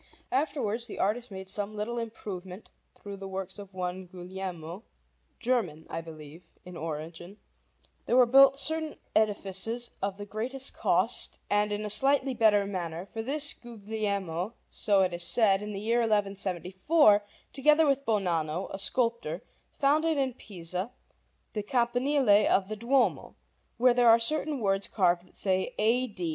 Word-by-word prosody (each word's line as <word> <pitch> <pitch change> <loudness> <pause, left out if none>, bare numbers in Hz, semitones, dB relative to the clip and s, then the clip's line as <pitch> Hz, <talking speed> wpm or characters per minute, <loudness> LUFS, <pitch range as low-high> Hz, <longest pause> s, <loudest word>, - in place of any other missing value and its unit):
Afterwards, 260 -5 -1
the - - -8
art 205 +3 +2
making 190 -1 -7
some 205 +2 -4
little 230 +3 -3
improvement 195 -4 -7 0.2
through 200 -1 -9
the 195 0 -7
works 190 +1 -5
of 200 -1 -10
one 185 0 -4
Guglielmo, 180 0 -7 0.6
German 210 - -1
(I 165 - -3
believe) 160 0 -11 0.2
in 180 -1 -10
origin, 165 +4 -6 0.7
there 245 - +3
were 250 - +7
built 275 +3 +6
certain 315 +2 -1 0.2
edifices 215 +2 0
of 195 0 -2
the 205 - -7
greatest 245 +6 -3
cost - - +1
and 210 0 +2
in 210 +1 -2
a 210 - +2
slightly 270 +4 +3
better 215 -4 +4
manner; 175 -3 -4
for 225 +3 -6
this 285 +5 +1
Guglielmo, 205 -4 -4 0.2
so 200 -3 +2
it 180 - 0
is 175 0 -2
said, 195 +1 +3
in 210 0 -5
the 195 - -4
year 230 +3 +1
1174, 205 - +2 0.3
together 300 +3 +4
with 275 -1 +1
Bonanno, 175 - -1
a 195 - -5
sculptor, 230 -6 0 0.3
founded 310 +3 +1
in 265 -2 0
Pisa 185 -2 -5 0.6
the 210 - -2
Campanile 245 0 +2
of 195 0 +2
the 215 - -3
Duomo, 245 +4 +1 0.4
where 250 +1 +5
there 240 -1 +5
are 225 - +8
certain 290 +3 0
words 195 -1 +1
carved 180 -3 +1
that - - -11
say: 190 +4 +1
A. 235 +4 +2
210 Hz, 150 wpm, -29 LUFS, 190-240 Hz, 0.7 s, are